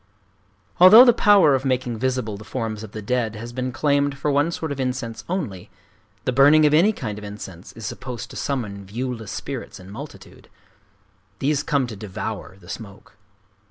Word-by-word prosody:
Although 215 Hz, +8 st, +10 dB
the 240 Hz, -, +6 dB
power 205 Hz, -10 st, +5 dB
of 135 Hz, -1 st, +1 dB
making 125 Hz, -3 st, -1 dB
visible 125 Hz, -4 st, -1 dB
the 105 Hz, -, -10 dB
forms 110 Hz, -3 st, -4 dB
of 110 Hz, -2 st, -9 dB
the 110 Hz, -1 st, -7 dB
dead 115 Hz, 0 st, -1 dB
has 120 Hz, +2 st, -8 dB
been 130 Hz, 0 st, -3 dB
claimed 140 Hz, +1 st, +1 dB
for 145 Hz, +2 st, -1 dB
one 145 Hz, +3 st, +2 dB
sort 160 Hz, -2 st, -4 dB
of 140 Hz, -, -4 dB
incense 125 Hz, -3 st, -3 dB
only, 135 Hz, -, -4 dB, 0.6 s
the -, -, +1 dB
burning 145 Hz, +4 st, +6 dB
of 150 Hz, -, +3 dB
any 175 Hz, +8 st, +5 dB
kind 110 Hz, -, -5 dB
of -, -, -12 dB
incense 100 Hz, -3 st, -9 dB
is 115 Hz, -, -9 dB
supposed 125 Hz, +3 st, -6 dB
to -, -, -11 dB
summon 105 Hz, -8 st, -3 dB
viewless 115 Hz, +2 st, -5 dB
spirits 130 Hz, -6 st, -6 dB
in 95 Hz, +1 st, -12 dB
multitude. 105 Hz, -, -11 dB, 0.9 s
These 145 Hz, +3 st, 0 dB
come 140 Hz, -4 st, 0 dB
to 115 Hz, -3 st, -7 dB
devour 95 Hz, -1 st, -6 dB
the 85 Hz, -, -17 dB
smoke. 100 Hz, -2 st, -9 dB
125 Hz, 180 wpm, -23 LUFS, 110-145 Hz, 0.9 s, Although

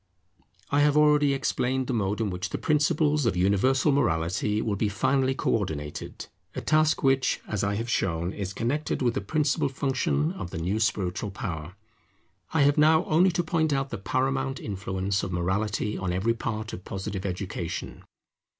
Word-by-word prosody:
I 145 Hz, -, +3 dB
have 145 Hz, 0 st, +4 dB
already 150 Hz, -1 st, +5 dB
explained 130 Hz, -1 st, 0 dB
the 130 Hz, -, -2 dB
mode 105 Hz, -2 st, 0 dB
in 110 Hz, -3 st, 0 dB
which 90 Hz, +2 st, -4 dB
the -, -, -3 dB
principles 150 Hz, -2 st, +2 dB
of 100 Hz, -, 0 dB
universal 100 Hz, -, +3 dB
morality 100 Hz, -4 st, +1 dB
will 110 Hz, -2 st, -1 dB
be 105 Hz, +1 st, 0 dB
finally 130 Hz, +6 st, +1 dB
co -, -, 0 dB
ordinated; 80 Hz, -9 st, -3 dB, 0.3 s
a -, -, -3 dB
task 155 Hz, 0 st, +2 dB
which, 135 Hz, -1 st, +2 dB
as 105 Hz, -2 st, -2 dB
I 100 Hz, 0 st, 0 dB
have 115 Hz, +3 st, -3 dB
shown, 85 Hz, -5 st, -1 dB
is 100 Hz, -2 st, -4 dB
connected 130 Hz, +8 st, -1 dB
with 120 Hz, -2 st, +2 dB
the -, -, -2 dB
principal 145 Hz, +7 st, 0 dB
function 135 Hz, +3 st, 0 dB
of 140 Hz, -, -6 dB
the 85 Hz, -, -6 dB
new 90 Hz, +6 st, -1 dB
spiritual 100 Hz, -2 st, -1 dB
power. 90 Hz, -, -6 dB, 0.8 s
I 160 Hz, -3 st, +3 dB
have 145 Hz, +2 st, +3 dB
now 160 Hz, +2 st, +5 dB
only 175 Hz, +4 st, +4 dB
to 175 Hz, 0 st, 0 dB
point 160 Hz, -1 st, +1 dB
out 135 Hz, 0 st, -1 dB
the 115 Hz, -, -4 dB
paramount 135 Hz, +5 st, -1 dB
influence 95 Hz, -1 st, -2 dB
of 95 Hz, -, -4 dB
morality 100 Hz, +4 st, -1 dB
on 95 Hz, -2 st, -2 dB
every 95 Hz, +6 st, +1 dB
part 110 Hz, -1 st, -4 dB
of 90 Hz, -, -7 dB
Positive 95 Hz, -1 st, -5 dB
Education. 90 Hz, -3 st, -4 dB
115 Hz, 175 wpm, -27 LUFS, 95-140 Hz, 0.8 s, already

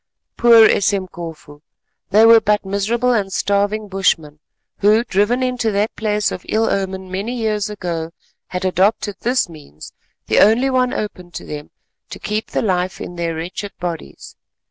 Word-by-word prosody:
Poor 230 Hz, -2 st, +7 dB
Esemkofu! 170 Hz, -7 st, -2 dB, 0.5 s
they 215 Hz, +3 st, +5 dB
were 225 Hz, 0 st, +8 dB
but 210 Hz, -2 st, +1 dB
miserable 225 Hz, +6 st, 0 dB
and 200 Hz, -4 st, -1 dB
starving 205 Hz, +2 st, 0 dB
bushmen 165 Hz, -6 st, 0 dB, 0.4 s
who, 210 Hz, +3 st, +4 dB
driven 230 Hz, +4 st, +1 dB
into 250 Hz, -3 st, 0 dB
that 210 Hz, +1 st, -1 dB
place 210 Hz, -2 st, 0 dB
of 180 Hz, -, -6 dB
ill 225 Hz, +1 st, +1 dB
omen 190 Hz, -1 st, -3 dB
many 200 Hz, +6 st, -3 dB
years 215 Hz, -2 st, -1 dB
ago, 170 Hz, -5 st, -4 dB, 0.4 s
had 180 Hz, +1 st, -4 dB
adopted 195 Hz, +2 st, +1 dB
this 245 Hz, +2 st, +1 dB
means, 150 Hz, -, -13 dB, 0.3 s
the -, -, +2 dB
only 235 Hz, +6 st, +4 dB
one 255 Hz, -1 st, +2 dB
open 185 Hz, -4 st, -5 dB
to -, -, -8 dB
them, 150 Hz, 0 st, -7 dB, 0.4 s
to -, -, -8 dB
keep 215 Hz, +1 st, -3 dB
the -, -, -1 dB
life 185 Hz, -2 st, -1 dB
in 175 Hz, -, -7 dB
their 170 Hz, -1 st, -2 dB
wretched 180 Hz, +5 st, -6 dB
bodies. 175 Hz, -2 st, -6 dB
200 Hz, 155 wpm, -19 LUFS, 180-220 Hz, 0.5 s, were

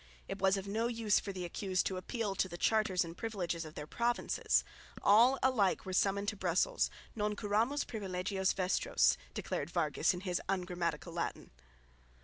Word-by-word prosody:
It 195 Hz, -, -5 dB
was 195 Hz, 0 st, +4 dB
of 195 Hz, 0 st, -5 dB
no 220 Hz, +4 st, 0 dB
use 230 Hz, -3 st, +2 dB
for 200 Hz, -, -5 dB
the 185 Hz, -2 st, -5 dB
accused 185 Hz, +1 st, -1 dB
to 190 Hz, -, -1 dB
appeal 205 Hz, +2 st, -2 dB
to 190 Hz, -1 st, 0 dB
the 175 Hz, -, -7 dB
charters 195 Hz, -3 st, +2 dB
and 165 Hz, 0 st, -8 dB
privileges 175 Hz, -6 st, -3 dB
of 155 Hz, -, -10 dB
their 150 Hz, -, -5 dB
provinces. 240 Hz, +8 st, +1 dB, 0.4 s
All 235 Hz, +6 st, +6 dB
alike 235 Hz, -8 st, +2 dB
were 185 Hz, -, -4 dB
summoned 200 Hz, +2 st, +2 dB
to 215 Hz, -, -5 dB
Brussels; 185 Hz, -2 st, +1 dB, 0.3 s
non 210 Hz, -1 st, -1 dB
curamus 220 Hz, +8 st, 0 dB
privilegios 190 Hz, -2 st, -1 dB
vestros 180 Hz, -, +2 dB, 0.2 s
declared 145 Hz, -, -3 dB
Vargas 165 Hz, -1 st, +1 dB
in 175 Hz, -, -6 dB
his 180 Hz, -2 st, -1 dB
ungrammatical 175 Hz, -3 st, -2 dB
Latin. 170 Hz, -, -4 dB
195 Hz, 165 wpm, -34 LUFS, 180-215 Hz, 0.4 s, All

